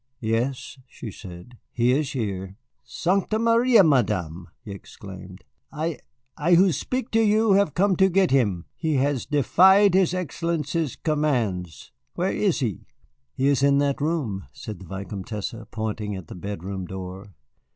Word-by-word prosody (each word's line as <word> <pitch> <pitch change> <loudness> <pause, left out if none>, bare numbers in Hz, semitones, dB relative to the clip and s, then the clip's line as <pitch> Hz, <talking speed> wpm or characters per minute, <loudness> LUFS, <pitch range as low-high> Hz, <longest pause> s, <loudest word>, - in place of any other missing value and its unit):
"Yes," 120 +4 -2
she 115 -3 -9
said, 95 +6 -12
"he 120 +1 +2
is 145 +2 0
here." 100 -6 -4 0.3
"Sancta 195 +4 0
Maria! 230 0 +5
Madame," 100 - 0 0.2
he 105 - -7
exclaimed, 95 -1 -11 0.3
"I 160 0 -3 0.4
I 170 +3 +3
who 185 +2 +5
speak 255 +8 -3
to 225 - +3
you 215 0 +3
have 195 -5 +3
come 195 +1 +3
to 190 0 +4
get 190 0 +2
him. 100 -10 +1
He 160 -2 -1
has 135 -1 0
defied 190 - +5
his 185 -1 +3
Excellency's 165 -3 -2
commands. 120 - -2 0.2
Where - - 0
is - - 0
he?" - - -3 0.5
"He 135 - 0
is 140 -1 +3
in 140 0 +4
that 140 0 0
room," 140 - -2
said 105 -5 -8
the 95 - -12
Vicomtesse, 100 +3 -5 0.2
pointing 110 -2 -4
at 95 -4 -9
the - - -7
bedroom 95 0 -6
door. 95 +1 -8
135 Hz, 150 wpm, -24 LUFS, -, 0.5 s, Maria